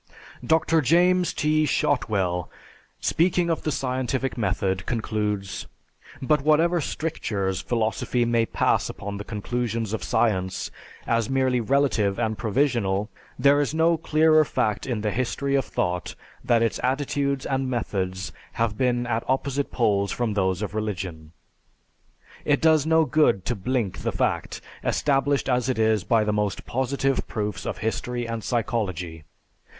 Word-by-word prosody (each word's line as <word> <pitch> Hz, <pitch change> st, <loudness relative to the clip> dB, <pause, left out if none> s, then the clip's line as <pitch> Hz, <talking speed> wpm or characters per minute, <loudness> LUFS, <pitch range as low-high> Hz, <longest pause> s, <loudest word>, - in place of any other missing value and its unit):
Dr. 160 Hz, 0 st, +3 dB
James 175 Hz, +4 st, +3 dB
T. 155 Hz, +1 st, +1 dB
Shotwell, 95 Hz, -13 st, 0 dB, 0.5 s
speaking 170 Hz, +1 st, +2 dB
of 160 Hz, -, -1 dB
the 155 Hz, -, -1 dB
scientific 130 Hz, 0 st, -1 dB
method, 95 Hz, -4 st, -1 dB
concludes, 105 Hz, -4 st, -2 dB, 0.6 s
"But 150 Hz, +2 st, +2 dB
whatever 160 Hz, +4 st, +3 dB
strictures 105 Hz, -, -2 dB
philosophy 120 Hz, +1 st, 0 dB
may 115 Hz, -1 st, +2 dB
pass -, -, +1 dB
upon 100 Hz, 0 st, -6 dB
the 100 Hz, -, -5 dB
conclusions 115 Hz, 0 st, -3 dB
of 110 Hz, -, -3 dB
science, 105 Hz, -6 st, 0 dB, 0.3 s
as 115 Hz, -2 st, +1 dB
merely 130 Hz, -2 st, +2 dB
relative 115 Hz, -6 st, +1 dB
and 110 Hz, 0 st, 0 dB
provisional, 110 Hz, -4 st, 0 dB, 0.3 s
there 140 Hz, +3 st, +4 dB
is 145 Hz, +2 st, -1 dB
no 165 Hz, +1 st, +4 dB
clearer 155 Hz, 0 st, +4 dB
fact 105 Hz, -6 st, -1 dB
in 120 Hz, -5 st, -2 dB
the 105 Hz, 0 st, 0 dB
history 130 Hz, +4 st, -1 dB
of 135 Hz, -2 st, +2 dB
thought, 90 Hz, -1 st, -2 dB, 0.3 s
that 115 Hz, -1 st, +3 dB
its 115 Hz, -, 0 dB
attitudes 140 Hz, +1 st, 0 dB
and 135 Hz, -1 st, -1 dB
methods 95 Hz, -6 st, -2 dB, 0.2 s
have 115 Hz, -2 st, 0 dB
been 120 Hz, -2 st, +1 dB
at 115 Hz, -1 st, -1 dB
opposite 135 Hz, +1 st, 0 dB
poles 100 Hz, -4 st, +1 dB
from 120 Hz, -3 st, -1 dB
those 95 Hz, -1 st, 0 dB
of 105 Hz, -, -4 dB
religion. 90 Hz, -7 st, -4 dB, 1.1 s
It -, -, +2 dB
does 160 Hz, -2 st, +4 dB
no 160 Hz, 0 st, +4 dB
good 125 Hz, -, +2 dB
to -, -, 0 dB
blink 110 Hz, 0 st, -2 dB
the -, -, -2 dB
fact, -, -, -1 dB, 0.2 s
established 140 Hz, 0 st, +1 dB
as 125 Hz, -1 st, +1 dB
it 130 Hz, -, 0 dB
is 110 Hz, -3 st, +2 dB
by 110 Hz, +4 st, +3 dB
the 105 Hz, 0 st, 0 dB
most 105 Hz, -1 st, -1 dB
positive 135 Hz, +1 st, -1 dB
proofs 105 Hz, -4 st, -3 dB
of -, -, -3 dB
history 120 Hz, +1 st, -2 dB
and 115 Hz, -1 st, -4 dB
psychology. 95 Hz, -, -2 dB
120 Hz, 145 wpm, -25 LUFS, 105-140 Hz, 1.1 s, there